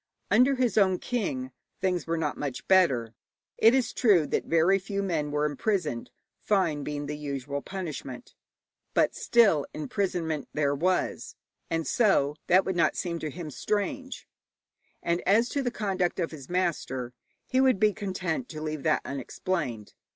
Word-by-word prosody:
Under 265 Hz, +2 st, +5 dB
his 250 Hz, -4 st, +2 dB
own 190 Hz, -2 st, +4 dB
king 145 Hz, -, -3 dB, 0.3 s
things 180 Hz, -3 st, -1 dB
were 165 Hz, 0 st, 0 dB
not 155 Hz, -2 st, -1 dB
much 140 Hz, -4 st, -5 dB
better. 135 Hz, -12 st, +3 dB, 0.5 s
It 225 Hz, +3 st, +6 dB
is 245 Hz, -3 st, +1 dB
true 200 Hz, -, +4 dB
that -, -, -1 dB
very 170 Hz, +4 st, +3 dB
few 200 Hz, +1 st, -3 dB
men 160 Hz, -6 st, -1 dB
were 150 Hz, +1 st, 0 dB
imprisoned, 150 Hz, -, -1 dB, 0.3 s
fine 170 Hz, -8 st, +1 dB
being 145 Hz, 0 st, -4 dB
the 150 Hz, +1 st, -4 dB
usual 140 Hz, -1 st, -4 dB
punishment, 155 Hz, -9 st, -6 dB, 0.6 s
but -, -, +3 dB
still, 200 Hz, -12 st, +3 dB
imprisonment 160 Hz, -3 st, -2 dB
there 145 Hz, -2 st, +2 dB
was, 180 Hz, +6 st, -1 dB, 0.3 s
and 165 Hz, -1 st, -1 dB
so 170 Hz, -, +2 dB
that 185 Hz, +2 st, +5 dB
would 190 Hz, -, -1 dB
not 170 Hz, -, +2 dB
seem 170 Hz, -2 st, -3 dB
to 155 Hz, -, -3 dB
him 155 Hz, +1 st, -7 dB
strange; 260 Hz, -, -3 dB, 0.8 s
and 170 Hz, +1 st, 0 dB
as 225 Hz, +5 st, +4 dB
to 280 Hz, -, -1 dB
the 250 Hz, -, 0 dB
conduct 190 Hz, -6 st, -1 dB
of 170 Hz, -, -1 dB
his 140 Hz, -5 st, -10 dB
master, 140 Hz, -9 st, -1 dB, 0.3 s
he 260 Hz, 0 st, +2 dB
would 260 Hz, -7 st, +4 dB
be 215 Hz, 0 st, +4 dB
content 190 Hz, +2 st, -3 dB
to 155 Hz, -, -7 dB
leave 155 Hz, -1 st, -4 dB
that -, -, +1 dB
unexplained. 140 Hz, -, -3 dB
170 Hz, 160 wpm, -28 LUFS, 150-200 Hz, 0.8 s, It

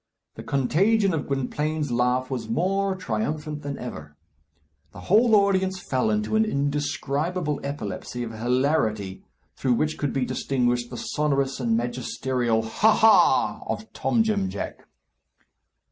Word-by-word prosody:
The -, -, -9 dB
contagion 190 Hz, -, +2 dB
of 155 Hz, -3 st, -2 dB
Gwynplaine's 145 Hz, +2 st, -2 dB
laugh 125 Hz, +2 st, +1 dB
was 115 Hz, -4 st, -4 dB
more 195 Hz, +9 st, 0 dB
triumphant 150 Hz, +1 st, -3 dB
than 140 Hz, -1 st, -5 dB
ever. 75 Hz, -12 st, -8 dB, 0.8 s
The -, -, -10 dB
whole 220 Hz, +3 st, +4 dB
audience 190 Hz, -2 st, +2 dB
fell 130 Hz, -9 st, 0 dB
into 105 Hz, -, 0 dB
an 220 Hz, -, +4 dB
indescribable 145 Hz, 0 st, -1 dB
epilepsy 120 Hz, -3 st, -5 dB
of 115 Hz, -, -5 dB
hilarity, 115 Hz, -4 st, 0 dB, 0.3 s
through 130 Hz, -2 st, +1 dB
which 155 Hz, +6 st, -1 dB
could 145 Hz, -3 st, -1 dB
be 135 Hz, -2 st, 0 dB
distinguished 120 Hz, -3 st, 0 dB
the 125 Hz, -, -7 dB
sonorous 140 Hz, -2 st, -1 dB
and 115 Hz, -3 st, +1 dB
magisterial 120 Hz, -1 st, -1 dB
ha! 210 Hz, -, +3 dB
ha! 220 Hz, 0 st, +4 dB
of -, -, -5 dB
Tom 230 Hz, -, +1 dB
Jim 205 Hz, -3 st, 0 dB
Jack. -, -, -6 dB
140 Hz, 130 wpm, -25 LUFS, 120-180 Hz, 0.8 s, whole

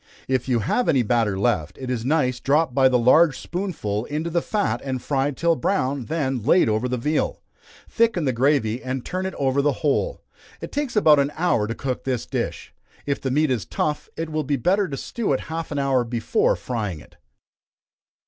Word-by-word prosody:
If 130 Hz, -1 st, -1 dB
you 120 Hz, -3 st, +2 dB
have 245 Hz, -, 0 dB
any 130 Hz, -4 st, +3 dB
batter 110 Hz, -3 st, +1 dB
left, 100 Hz, -8 st, 0 dB
it 130 Hz, -1 st, -5 dB
is 120 Hz, -3 st, -2 dB
nice 130 Hz, -3 st, +1 dB
dropped 145 Hz, +1 st, +2 dB
by 130 Hz, 0 st, +5 dB
the 125 Hz, -, +3 dB
large 135 Hz, +5 st, +5 dB
spoonful 150 Hz, -, -3 dB
into 155 Hz, +4 st, -3 dB
the 170 Hz, +1 st, +1 dB
fat, 210 Hz, +2 st, -1 dB
and 130 Hz, -2 st, -3 dB
fried 135 Hz, +1 st, -1 dB
till 170 Hz, 0 st, +2 dB
brown, 130 Hz, -1 st, -1 dB
then 135 Hz, -5 st, -1 dB
laid 150 Hz, -, +4 dB
over 110 Hz, +3 st, 0 dB
the 125 Hz, -, -1 dB
veal. 150 Hz, +6 st, -1 dB, 0.4 s
Thicken 225 Hz, -8 st, +1 dB
the 130 Hz, -, +1 dB
gravy 125 Hz, -2 st, +1 dB
and 130 Hz, 0 st, -4 dB
turn 185 Hz, +1 st, -2 dB
it 190 Hz, -, -6 dB
over 135 Hz, 0 st, +1 dB
the 145 Hz, +1 st, +2 dB
whole. -, -, 0 dB, 0.4 s
It -, -, -7 dB
takes 290 Hz, -4 st, -2 dB
about 155 Hz, -8 st, +6 dB
an 140 Hz, +1 st, +1 dB
hour 160 Hz, -11 st, +1 dB
to 115 Hz, -, -4 dB
cook 130 Hz, -2 st, -3 dB
this 130 Hz, -3 st, -2 dB
dish. -, -, -4 dB, 0.3 s
If 140 Hz, -1 st, -2 dB
the 135 Hz, -, -2 dB
meat 150 Hz, +2 st, +2 dB
is 120 Hz, -6 st, 0 dB
tough, 150 Hz, -, -2 dB
it 165 Hz, -1 st, -4 dB
will 155 Hz, 0 st, -1 dB
be 140 Hz, +1 st, 0 dB
better 190 Hz, -, +2 dB
to 135 Hz, -, -4 dB
stew 225 Hz, -, -2 dB
it 130 Hz, -, 0 dB
half 165 Hz, 0 st, -4 dB
an 145 Hz, -, -3 dB
hour 135 Hz, -3 st, +2 dB
before 115 Hz, -1 st, +1 dB
frying 105 Hz, -9 st, -4 dB
it. -, -, -18 dB
135 Hz, 205 wpm, -23 LUFS, 125-160 Hz, 0.4 s, about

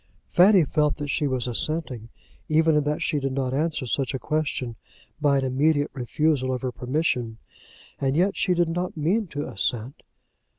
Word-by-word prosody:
Fanny 185 Hz, 0 st, +6 dB
felt 150 Hz, 0 st, +1 dB
that 145 Hz, -1 st, -5 dB
she 145 Hz, -, 0 dB
was 130 Hz, -2 st, -1 dB
assenting, 125 Hz, -2 st, -1 dB, 0.4 s
even 160 Hz, 0 st, +3 dB
in 150 Hz, -, +3 dB
that 150 Hz, +1 st, -1 dB
she 150 Hz, -, 0 dB
did 135 Hz, -1 st, -2 dB
not 130 Hz, -1 st, -1 dB
answer 150 Hz, -1 st, -1 dB
such 135 Hz, +2 st, -1 dB
a -, -, -3 dB
question 140 Hz, -3 st, -2 dB, 0.5 s
by 145 Hz, -2 st, +3 dB
an 135 Hz, -, 0 dB
immediate 145 Hz, +3 st, +1 dB
refusal 135 Hz, +1 st, 0 dB
of 130 Hz, 0 st, -3 dB
her 130 Hz, -, -1 dB
permission; 125 Hz, -4 st, -1 dB, 0.6 s
and 135 Hz, +1 st, 0 dB
yet 190 Hz, +3 st, +2 dB
she 180 Hz, -2 st, +1 dB
did 175 Hz, -1 st, +2 dB
not 175 Hz, +1 st, -3 dB
mean 185 Hz, +8 st, +1 dB
to 150 Hz, -2 st, -5 dB
assent. 120 Hz, +6 st, -2 dB
145 Hz, 175 wpm, -25 LUFS, 130-160 Hz, 0.6 s, Fanny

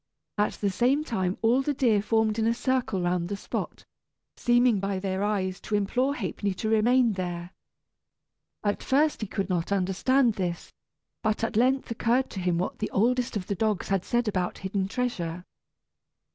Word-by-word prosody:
At 210 Hz, -, +2 dB
the 200 Hz, -2 st, -1 dB
same 255 Hz, +9 st, +2 dB
time 190 Hz, -, -1 dB
all 240 Hz, +4 st, +4 dB
the 290 Hz, +1 st, -1 dB
deer 230 Hz, -6 st, +3 dB
formed 220 Hz, 0 st, +1 dB
in 220 Hz, -, +2 dB
a 230 Hz, -, +2 dB
circle 245 Hz, -7 st, 0 dB
round 175 Hz, 0 st, 0 dB
the 200 Hz, -, -3 dB
spot, -, -, -5 dB, 0.5 s
seeming 240 Hz, -3 st, +3 dB
by 195 Hz, 0 st, -2 dB
their 190 Hz, 0 st, -2 dB
eyes 190 Hz, -3 st, -1 dB
to 215 Hz, -, -2 dB
implore 250 Hz, +7 st, +1 dB
Ha'penny 200 Hz, -2 st, -2 dB
to 220 Hz, -, -2 dB
remain 230 Hz, +2 st, +4 dB
there. 175 Hz, -2 st, -4 dB, 1.1 s
At 205 Hz, -1 st, 0 dB
first 295 Hz, +1 st, +2 dB
he 215 Hz, -, -2 dB
could 195 Hz, -1 st, -2 dB
not 180 Hz, -1 st, -1 dB
understand 210 Hz, +7 st, +2 dB
this, 180 Hz, -4 st, -4 dB, 0.5 s
but 215 Hz, 0 st, 0 dB
at 225 Hz, -, -1 dB
length 255 Hz, +3 st, +2 dB
occurred 240 Hz, +3 st, +1 dB
to 195 Hz, -, -5 dB
him 180 Hz, -2 st, 0 dB
what 180 Hz, -, -3 dB
the 215 Hz, -, -2 dB
oldest 240 Hz, +2 st, +1 dB
of 185 Hz, -, -5 dB
the 200 Hz, -, -2 dB
dogs 210 Hz, 0 st, -1 dB
had 195 Hz, -2 st, +1 dB
said 240 Hz, -1 st, 0 dB
about 185 Hz, -4 st, -1 dB
hidden 190 Hz, 0 st, -2 dB
treasure. 180 Hz, -7 st, -3 dB
210 Hz, 175 wpm, -27 LUFS, 190-240 Hz, 1.1 s, all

